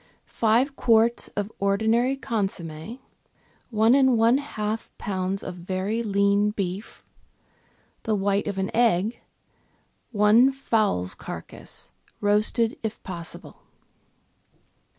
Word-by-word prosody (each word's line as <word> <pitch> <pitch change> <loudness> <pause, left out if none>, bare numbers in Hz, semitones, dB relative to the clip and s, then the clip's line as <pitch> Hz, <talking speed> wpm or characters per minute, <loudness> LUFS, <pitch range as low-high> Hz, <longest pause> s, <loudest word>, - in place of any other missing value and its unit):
— - - -44
Five 240 +5 +1
quarts 230 -1 +3
of 205 +1 -2
ordinary 220 +6 +2
consomm^, 195 - -4 0.7
one 225 0 +4
and 265 -3 +4
one 230 +4 +4
half 220 -6 -4
lbs. 190 0 -3
of 185 - -5
very 185 +5 -2
lean 200 -1 +2
beef, 200 0 -5 1.0
the 220 - 0
white 200 +1 0
of 200 -1 -3
an 190 0 -2
egg, 225 -2 +2 0.9
one 220 +4 +5
fowl's 215 - 0
carcase - - -8 0.3
(roasted 215 +3 +1
if 220 -1 -5
possible). 170 -3 -8
210 Hz, 105 wpm, -25 LUFS, 195-230 Hz, 1.0 s, one